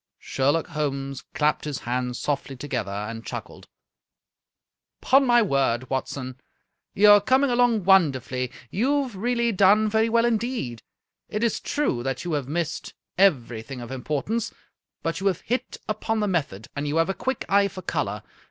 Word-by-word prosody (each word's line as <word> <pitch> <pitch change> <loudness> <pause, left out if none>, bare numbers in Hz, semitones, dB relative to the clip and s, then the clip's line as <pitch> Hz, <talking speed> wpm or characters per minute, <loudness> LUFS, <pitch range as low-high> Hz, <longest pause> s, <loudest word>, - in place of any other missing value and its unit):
Sherlock 145 +5 0
Holmes 140 -4 -3
clapped 150 0 +1
his 145 -3 -3
hands 125 +1 -2
softly 140 -2 -2
together 125 -6 -3
and 105 +3 -5
chuckled. - - -8 0.7
" - - -63
Ton 270 0 +5
my 240 -1 +5
word, 130 - 0
Watson, 130 -1 -4 0.6
you 210 +1 +7
are 205 0 +8
coming 260 +5 +3
along 240 -4 +3
won 190 -5 +6
derfully. 125 -1 -4 0.2
You 280 +7 +1
have 250 -6 -8
really 235 +3 0
done 205 +2 +5
very 220 +1 +2
well 230 +1 +3
indeed. 230 - -1 0.5
It 210 +2 -2
is 235 - +1
true 285 - -1
that 135 +4 -3
you 175 - -2
have 145 -4 -1
missed 165 +2 -3 0.2
everything 125 - +1
of 120 +1 -8
importance, 150 - -2 0.5
but 165 - -2
you 195 - 0
have 185 -3 0
hit 250 +3 -3
upon 215 +1 -1
the 210 - +1
method, 140 - -2
and 145 +1 -2
you 145 - -1
have 165 +2 +2
a - - +1
quick 260 +8 -3
eye 200 0 +4
for 185 -1 -9
color. 105 - -2
165 Hz, 170 wpm, -25 LUFS, 130-215 Hz, 0.7 s, are